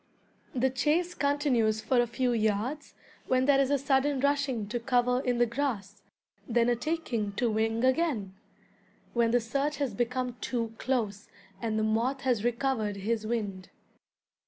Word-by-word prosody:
The 260 +1 +2
chase 315 +7 +1
continues 280 -8 +1
for 240 +3 +2
a 240 - 0
few 245 +1 0
yards, 225 +6 -1 0.3
when 255 0 +2
there 280 -1 +5
is 270 -1 +2
a 285 - +3
sudden 275 +1 +1
rushing 275 -5 0
to 240 +2 -2
cover 250 0 +2
in 250 -2 0
the 240 - +4
grass, 225 -6 -3 0.5
then 235 0 +2
a 240 - +3
taking 240 -8 -2
to 235 +2 0
wing 225 +2 0
again, 260 - +1 0.8
when 235 -1 +3
the 245 +1 +3
search 275 +5 -1
has 275 -6 -1
become 250 +2 -2
too 230 -3 -2
close, 215 -6 -2 0.3
and 220 -2 -1
the 215 - +1
moth 235 +5 0
has 245 -5 +1
recovered 240 -3 0
his 215 +2 -2
wind. 205 -5 -3
245 Hz, 160 wpm, -29 LUFS, 220-270 Hz, 0.8 s, there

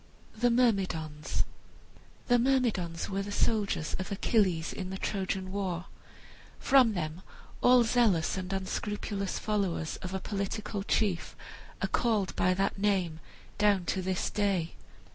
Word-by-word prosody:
THE 240 +2 +2
MYRMIDONS 185 -11 +1 0.8
The 245 -1 +4
Myrmidons 230 -10 +1
were 195 0 -2
the 200 +1 -5
soldiers 205 -7 0
of 185 - -5
Achilles, 190 -5 +1
in 185 -1 -5
the 190 - -4
Trojan 190 -1 -2
war. 185 -3 -2 0.7
From 255 -6 +4
them 160 0 -3 0.4
all 245 -1 +6
zealous 225 -8 +2
and 185 -1 -4
unscrupulous 195 +1 -3
followers 195 -7 -1
of 185 +1 -5
a - - -1
political 200 +1 -3
chief 195 -3 0 0.5
are - - +2
called 220 -5 +1
by 185 0 +2
that 195 +1 0
name, 190 -6 +1 0.4
down 205 -3 +3
to 190 - -2
this 185 0 -1
day. 195 -5 0
195 Hz, 130 wpm, -30 LUFS, 180-215 Hz, 0.8 s, all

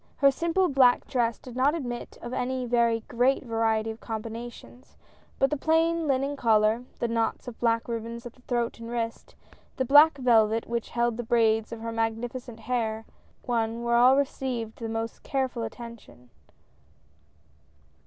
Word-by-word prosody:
Her 275 -1 +5
simple 340 +6 +1
black 265 -5 +4
dress 235 -3 0
did 250 -2 -12
not 275 +5 +3
admit 245 -6 -5
of 240 +1 -6
any 255 0 -2
very 235 -1 +2
great 250 +5 +1
variety 225 -2 0
of 220 - -10
combinations, 230 +2 -8 0.4
but 270 - +2
the 300 - 0
plain 325 +2 +2
linen 275 +1 0
collar, 225 -1 +2
the 235 - -1
knots 230 +2 -1
of 240 - -8
black 230 -1 +1
ribbon 230 0 -4
at 235 0 -9
throat 240 -2 -1
and 230 0 -8
wrist, 230 -1 -4 0.4
the 260 - 0
black 295 +3 +7
velvet 225 -3 +3
which 235 -1 -3
held 235 -1 0
the 240 - -3
braids 225 -1 +2
of 230 -1 -7
her 230 0 -4
magnificent 225 +1 -3
hair, 225 -2 -2 0.4
one 230 -3 +1
and 235 +1 -5
all 245 +3 +5
received 255 -5 -2
the 225 -1 -4
most 225 0 -4
careful 260 -3 -2
attention. 225 - -9
235 Hz, 155 wpm, -27 LUFS, 225-255 Hz, 0.4 s, black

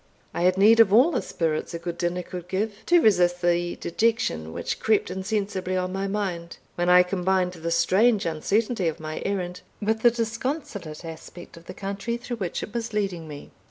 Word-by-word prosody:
I - - -3
had 180 +1 +3
need 220 +4 +6
of 225 -4 +7
all 250 +11 +6
the - - 0
spirits 160 -1 -2
a - - -1
good 170 0 -6
dinner 175 +1 -1
could 180 0 -8
give, 205 +4 -1
to 345 -1 +5
resist 175 -4 +3
the 175 0 +1
dejection 170 - -1
which - - -4
crept 215 -4 +1
insensibly 190 -1 -2
on 185 0 -2
my 195 +1 -2
mind, 185 -4 -3 0.2
when 175 0 0
I 180 0 +7
combined 180 0 0
the 165 -1 -5
strange 200 +6 +3
uncertainty 195 +5 0
of 160 - -2
my 155 0 -5
errand 180 -3 -3 0.2
with 220 +1 0
the 240 - +7
disconsolate 225 - -4
aspect 165 +2 -10
of 165 0 -14
the 185 - -9
country 200 +4 -3
through 240 0 -6
which 185 -5 -3
it 210 - -8
was 230 -1 -3
leading 195 -6 -2
me. 145 -2 -10
185 Hz, 195 wpm, -25 LUFS, 175-215 Hz, 0.2 s, of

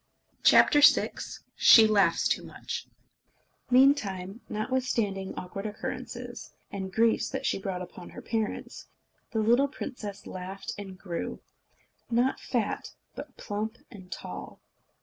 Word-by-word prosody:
VI - - +8 0.9
She 225 - +8
Laughs 210 -2 +3
Too - - 0
Much - - -6 0.8
Meantime, 230 -7 +3
notwithstanding 215 -4 -1
awkward 195 +3 -5
occurrences, 210 +1 -6 0.2
and 190 -1 -5
griefs 225 +3 +2
that - - -4
she - - +1
brought 190 -2 -3
upon 180 0 -11
her - - -10
parents, 220 -2 -3 0.4
the 225 - -4
little 240 +6 +4
princess 210 -7 -7
laughed 185 +1 -6
and 195 -2 -8
grew 175 -3 -5 0.7
not 240 +3 +2
fat, 235 -5 -2 0.2
but 280 -2 -9
plump 215 +3 -4
and 190 -5 -12
tall. - - -7
210 Hz, 115 wpm, -28 LUFS, 190-235 Hz, 0.9 s, VI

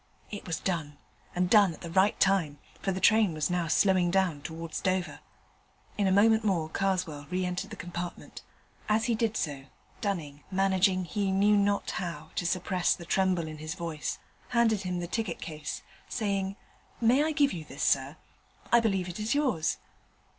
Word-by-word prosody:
It 205 -2 -7
was 165 - -2
done, 155 -6 -3 0.4
and 180 0 +2
done 200 -4 +5
at - - -18
the 170 - -7
right 190 +3 +3
time, 185 -7 +2 0.2
for 195 - 0
the 190 - -2
train 210 -4 +4
was 155 +3 -1
now 175 -2 0
slowing 185 +1 +3
down 180 -5 +1
towards 160 0 -6
Dover. 185 -1 -1 0.8
In 200 -2 +1
a - - +3
moment 220 +3 +5
more 175 -7 0
Karswell 180 -6 -1
re 185 0 -1
entered 180 +3 -3
the 215 - -7
compartment. 175 -2 -7 0.5
As 220 +2 +3
he 240 - +1
did 225 0 0
so, 140 -4 -3 0.4
Dunning, 160 -9 -3
managing, 190 -1 +2
he 195 +3 -1
knew 200 +2 +4
not 200 0 +1
how, 160 -4 -5
to 175 - 0
suppress 180 0 +1
the 170 - -10
tremble 180 -2 +1
in 155 -1 -8
his 155 +2 -5
voice, 165 -3 -4 0.3
handed 235 -4 +3
him 180 -1 -3
the 175 - -4
ticket 225 +4 -2
case, 155 -2 -6 0.3
saying, 200 -3 -1 0.4
'May 245 +5 +4
I 315 - +1
give 290 -2 +2
you 165 -3 -5
this, 140 -1 -6
sir? 140 +3 +1 0.5
I 235 - +7
believe 195 -5 0
it 180 +3 -6
is 215 +5 0
yours.' 250 - +1
185 Hz, 180 wpm, -29 LUFS, 165-205 Hz, 0.8 s, I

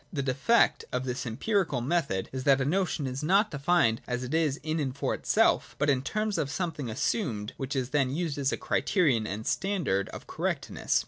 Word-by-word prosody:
The 145 -6 -2
defect 135 - +3
of 125 +1 -2
this 125 0 -3
empirical 165 - 0
method 130 - 0
is 130 -1 -4
that 140 -1 +5
a 135 - 0
notion 170 -2 0
is 130 0 -3
not 195 +8 +3
defined 145 -6 +2
as 125 0 -2
it 125 +4 -5
is 155 -4 +2
in 155 +1 -1
and 135 -2 -2
for - - 0
itself, - - +2
but 145 - +3
in 130 -2 +1
terms 215 +7 -1
of 140 - -1
something 150 -4 -3
assumed, 110 - -1
which 135 0 -4
is 130 -1 -2
then 135 -3 +2
used 150 0 -2
as 135 0 +1
a - - -1
criterion 140 - +1
and 105 +2 -5
standard 175 - 0
of - - -9
correctness. - - -1
140 Hz, 200 wpm, -28 LUFS, 125-170 Hz, -, that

